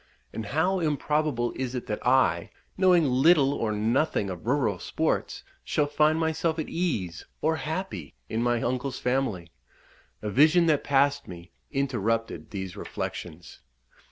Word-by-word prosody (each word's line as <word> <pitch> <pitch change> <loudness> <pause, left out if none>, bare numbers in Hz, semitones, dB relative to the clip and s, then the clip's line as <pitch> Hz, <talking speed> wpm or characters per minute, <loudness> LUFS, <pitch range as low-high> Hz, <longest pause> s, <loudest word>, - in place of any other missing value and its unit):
and 110 -2 -5
how 170 - +1
improbable 150 -5 0
is 130 -1 -3
it 125 - -4
that 105 - -4
I, 130 +2 +3 0.3
knowing 180 -3 +4
little 140 +2 +4
or 115 -6 -1
nothing 110 -1 0
of 90 +4 -8
rural 120 -8 +1
sports, - - -2 0.2
shall 150 - +1
find 150 +2 +2
myself 160 0 0
at 160 - -3
ease, 105 - -2
or 160 +1 +1
happy, 155 - -5
in 110 +7 -2
my 120 -1 +1
uncle's 130 +2 -2
family. 125 -10 -1 0.7
A 105 - -2
vision 155 - +5
that 155 -3 +2
passed 140 0 +2
me 85 0 -10 0.2
interrupted 115 -5 -1
these 95 -3 -5
reflections. 85 0 -6
130 Hz, 140 wpm, -27 LUFS, 110-155 Hz, 0.7 s, vision